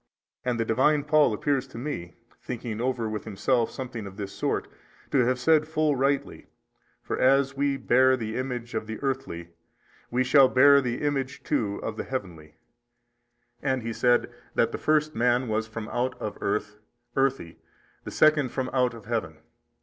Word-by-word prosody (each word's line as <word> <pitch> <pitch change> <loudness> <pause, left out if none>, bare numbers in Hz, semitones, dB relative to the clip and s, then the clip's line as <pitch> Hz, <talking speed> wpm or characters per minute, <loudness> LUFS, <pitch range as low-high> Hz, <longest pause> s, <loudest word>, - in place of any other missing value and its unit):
And 125 -2 -1
the 115 - +1
Divine 140 +6 +2
Paul 150 -3 +4
appears 135 +4 0
to 130 - -11
me, 100 - -5 0.3
thinking 115 -3 -5
over 125 -2 -1
with 110 -1 -4
himself 115 +3 0
something 120 -5 -6
of 95 0 -11
this 100 -2 -5
sort, - - -1 0.4
to 140 - +3
have 130 +1 +1
said 155 +4 +3
full 155 -2 +1
rightly, 135 +1 -1 0.6
For - - -3
as 135 +1 +3
we 140 0 0
bare 130 +1 +4
the 110 -2 -4
image 125 -2 -4
of 110 -1 -3
the 110 0 -5
earthy 135 -11 -3 0.6
we 125 +2 +1
shall 135 +1 +6
bear 140 +2 +6
the 120 0 -3
image 140 -2 -2
too 100 -3 -1
of 110 -1 -4
the - - -3
heavenly: 85 - -6 1.1
and 130 -3 -1
he 115 0 -3
said 120 +1 +2 0.2
that - - +2
the - - -5
first 155 0 +2
man 125 +1 +2
was 110 0 -1
from 110 -1 -6
out 125 +1 -2
of 105 - -4
earth, 105 +1 -2 0.4
earthy, 135 -11 0 0.4
the - - -6
second 155 -4 +3
from 130 +1 -3
out 125 -2 +2
of 110 -3 -12
Heaven. 105 -9 -3
125 Hz, 170 wpm, -26 LUFS, 110-135 Hz, 1.1 s, shall